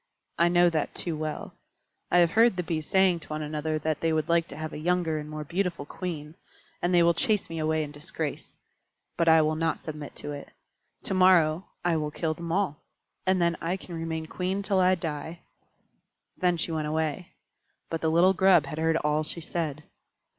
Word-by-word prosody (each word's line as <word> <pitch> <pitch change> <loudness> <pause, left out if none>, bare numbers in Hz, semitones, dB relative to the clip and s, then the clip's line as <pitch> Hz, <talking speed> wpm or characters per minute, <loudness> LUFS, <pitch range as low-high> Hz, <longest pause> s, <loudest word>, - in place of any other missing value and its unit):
I 170 +1 +5
know 175 0 +5
that 155 -2 -2
too 170 -3 -2
well. 155 0 -5 0.6
I - - +3
have 170 -1 +5
heard 225 +1 +5
the 180 - -2
Bees 155 -2 -3
saying 190 -3 +3
to - - -15
one 155 0 -4
another 155 +1 -2
that 155 0 -1
they 165 - +1
would 155 -1 0
like 170 0 +2
to - - -8
have 155 0 -5
a - - -5
younger 170 -1 0
and 150 0 -7
more 155 0 -5
beautiful 170 -1 -2
Queen, 155 -2 -6 0.5
and 175 - +1
they 175 -1 +5
will 170 0 +5
chase 210 -1 +1
me 165 - -4
away 155 0 +1
in 145 - -7
disgrace. 150 0 -6 0.6
But 170 - +1
I 160 -1 +6
will 155 +1 +1
not 160 +1 -1
submit 150 -2 -8
to 145 - -5
it. 145 -1 -7 0.5
To - - -2
morrow 185 -2 +4 0.2
I 170 -2 +2
will 150 -1 -1
kill 155 +1 -2
them 170 +1 -6
all; 180 -5 0 0.5
then 175 -3 +3
I 175 +3 -1
can 185 - -11
remain 165 -1 -3
Queen 185 +4 -2
till 195 -2 +1
I 185 0 +4
die." 160 0 -5 0.9
Then 180 -2 +1
she 165 - -1
went 155 -2 -2
away. 160 +3 -2 0.6
But 165 - -2
the 160 - +1
little 175 +4 +5
Grub 190 -6 +5
had 150 +3 -6
heard 160 0 +2
all 150 0 +1
she 155 - -2
said. 155 -3 -3
165 Hz, 205 wpm, -27 LUFS, 155-175 Hz, 0.9 s, I